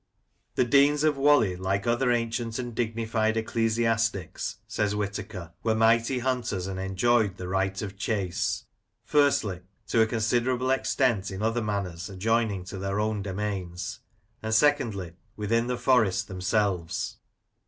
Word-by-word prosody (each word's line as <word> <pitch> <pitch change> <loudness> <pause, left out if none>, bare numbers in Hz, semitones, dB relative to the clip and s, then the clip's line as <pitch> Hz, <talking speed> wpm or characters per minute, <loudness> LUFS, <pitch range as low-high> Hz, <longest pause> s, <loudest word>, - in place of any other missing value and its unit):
" - - -46
The 125 - +3
Deans 140 +4 +4
of 155 -2 +3
Whalley, 135 -9 +4
like 95 +3 -1
other 120 +2 +2
ancient 115 -1 -1
and 120 -2 -4
dignified 110 -1 0
ecclesiastics," 115 -3 0
says 105 -1 -1
Whitaker, 100 -4 -4
"were 110 -1 +1
mighty 115 +3 +3
hunters, 120 -7 -1
and 95 -1 -4
enjoyed 100 +2 +1
the 90 - -6
right 95 0 0
of 100 -2 -6
chase: 100 -4 -1 0.2
— - - -44
^firstly, 135 -11 +2 0.3
to 115 - +3
a 110 - +4
considerable 120 +3 +1
extent 125 -6 +1
in 95 +2 -5
other 115 +2 +1
manors 100 -4 -3
adjoining 105 0 0
to 95 +1 -7
their 100 +1 -2
own 105 -1 0
domains; 95 -1 -4 0.4
and 110 0 0
secondly, 115 - +2 0.2
within 115 +3 +1
the 125 0 -1
forests 110 -7 +3
themselves." 90 -2 -1
110 Hz, 145 wpm, -27 LUFS, 95-120 Hz, 0.4 s, Deans